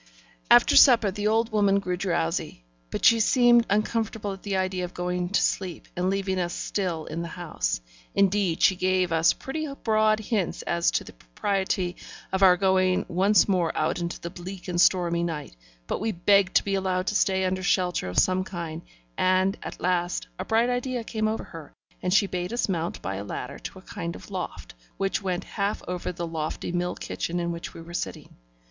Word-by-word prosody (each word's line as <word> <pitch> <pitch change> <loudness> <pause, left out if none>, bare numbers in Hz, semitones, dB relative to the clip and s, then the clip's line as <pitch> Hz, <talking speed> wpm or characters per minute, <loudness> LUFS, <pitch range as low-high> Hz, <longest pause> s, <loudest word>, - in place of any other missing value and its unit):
After - - +6
supper, 235 -6 +7
the 205 +2 -2
old 225 +2 +2
woman 200 -2 +3
grew 185 -2 -1
drowsy; 170 - -2 0.3
but - - -2
she 230 - +7
seemed 240 +1 +5
uncomfortable 215 0 -1
at 190 - -11
the 200 -2 -2
idea 185 -1 -1
of 180 - -6
going 180 0 -2
to 200 - +2
sleep 185 -4 -2
and 180 +1 0
leaving 190 -1 -1
us 175 -1 -2
still 175 -6 -2
in 165 +2 -4
the 170 - -4
house. 155 - -3 0.3
Indeed, 195 -3 +2
she 190 - +6
gave 185 -1 +1
us 165 0 +4
pretty 305 +2 -5
broad 215 -1 +3
hints 210 -4 -2
as 170 0 +1
to - - -1
the - - -12
propriety 180 - -2 0.4
of 190 - 0
our 185 -2 +7
going 185 -1 +2
once 195 +4 +4
more 180 -5 +1
out - - 0
into 170 0 -4
the 170 - -6
bleak 185 +1 -8
and 175 -1 +1
stormy 170 -2 +3
night; 160 - -4 0.3
but - - -2
we 220 +1 0
begged 195 +1 +3
to - - +5
be 200 - -2
allowed 185 -1 0
to 210 - -1
stay 190 -2 +2
under 185 0 -1
shelter 180 - +1
of 90 - -7
some 185 0 +3
kind; 170 -3 -6 0.4
and, 185 +1 +3
at - - -7
last, 175 -1 0
a - - -3
bright 225 +2 +2
idea 245 -1 -2
came 215 -1 -1
over 220 +1 -2
her, 160 -3 -11 0.3
and 180 - -1
she 200 +1 +5
bade 180 -1 -3
us 240 - 0
mount 170 -3 -2
by 95 0 -3
a 100 - -5
ladder 100 - -6
to - - -8
a - - -13
kind 85 +1 -5
of 90 - -12
loft, - - -6 0.2
which 195 +2 -1
went 185 -1 -2
half 200 0 -2
over 180 0 -3
the 175 -1 -5
lofty 160 0 -4
mill 175 0 -1
kitchen 175 +1 -3
in 170 0 -1
which 170 0 -7
we - - -8
were 170 +1 -11
sitting. 95 - -5
185 Hz, 200 wpm, -26 LUFS, 175-200 Hz, 0.4 s, supper